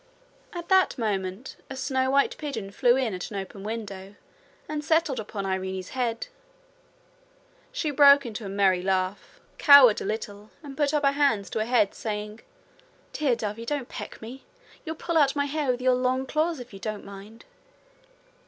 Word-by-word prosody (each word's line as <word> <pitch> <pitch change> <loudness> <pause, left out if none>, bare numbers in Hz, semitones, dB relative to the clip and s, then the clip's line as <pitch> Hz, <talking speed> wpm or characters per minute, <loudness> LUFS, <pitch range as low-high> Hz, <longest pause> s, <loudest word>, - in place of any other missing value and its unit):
At 345 -1 -7
that 380 -4 +4
moment 200 0 -3
a 265 - -6
snow 260 0 -1
white 280 +1 +2
pigeon 230 -10 -5
flew 240 +4 +3
in 255 -5 0
at 180 - -5
an 205 - -6
open 195 0 -7
window 200 -3 -6 0.5
and 300 -1 -4
settled 315 -4 +1
upon 205 -2 -5
Irene's 190 -1 -3
head. 240 -3 -2 1.5
She 360 -12 -2
broke 280 -1 +6
into 225 -1 -6
a 195 - -6
merry 190 -2 +2
laugh, 185 +1 -2 0.2
cowered 280 -7 +8
a - - -4
little, 210 0 -5
and 280 -2 -9
put 285 0 +1
up 295 -2 +1
her 275 - +5
hands 280 -9 +1
to - - -2
her 215 - 0
head, 225 -4 +2
saying: 210 0 -5 0.7
'Dear 280 -5 +1
dovey, 220 0 -5
don't 275 0 -3
peck - - -8
me. 250 +4 -9 0.4
You'll 320 0 -4
pull 335 0 0
out 275 -1 +3
my 285 -1 +1
hair 290 -1 -2
with 250 0 0
your 255 0 +4
long 255 +1 0
claws 310 +2 -1
if 245 -3 -11
you 195 - -9
don't 215 0 -5
mind.' 200 +3 -12
240 Hz, 175 wpm, -26 LUFS, 205-280 Hz, 1.5 s, cowered